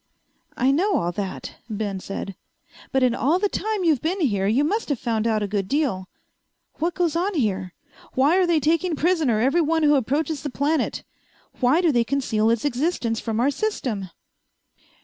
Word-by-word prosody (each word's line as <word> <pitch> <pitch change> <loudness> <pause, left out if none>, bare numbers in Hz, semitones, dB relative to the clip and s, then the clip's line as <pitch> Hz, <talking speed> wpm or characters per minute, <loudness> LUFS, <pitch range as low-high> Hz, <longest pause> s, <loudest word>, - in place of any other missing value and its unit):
"I 260 +2 +3
know 380 +8 +2
all 175 - 0
that," 190 +1 -6
Ben 205 -3 -3
said. 195 +1 -6 0.6
"But 265 -1 +2
in 250 -2 +3
all 280 +8 +2
the 410 +2 +1
time 425 -1 -2
you've 310 -7 +2
been 355 +5 -1
here 200 - +1
you 240 +8 +2
must 410 +7 -1
have 285 - 0
found 225 -2 -1
out 215 -2 +1
a - - -1
good 200 -1 -2
deal. 240 -9 -1 0.7
What 335 +1 -1
goes 335 -2 0
on 370 +3 0
here? 195 - -1 0.4
Why 285 +7 +3
are 370 -2 +3
they 335 -2 +3
taking 330 +3 +1
prisoner 305 -8 +1
every 275 +9 +3
one 320 0 +1
who 295 0 +5
approaches 285 +3 0
the 290 - -4
planet? 290 +4 -1 0.6
Why 265 +7 +3
do 340 -3 +3
they 240 -3 +3
conceal 230 -4 0
its 230 +3 0
existence 255 -4 -1
from 225 -1 -3
our 265 +4 +3
system?" 250 - -3
275 Hz, 185 wpm, -23 LUFS, 220-325 Hz, 0.7 s, who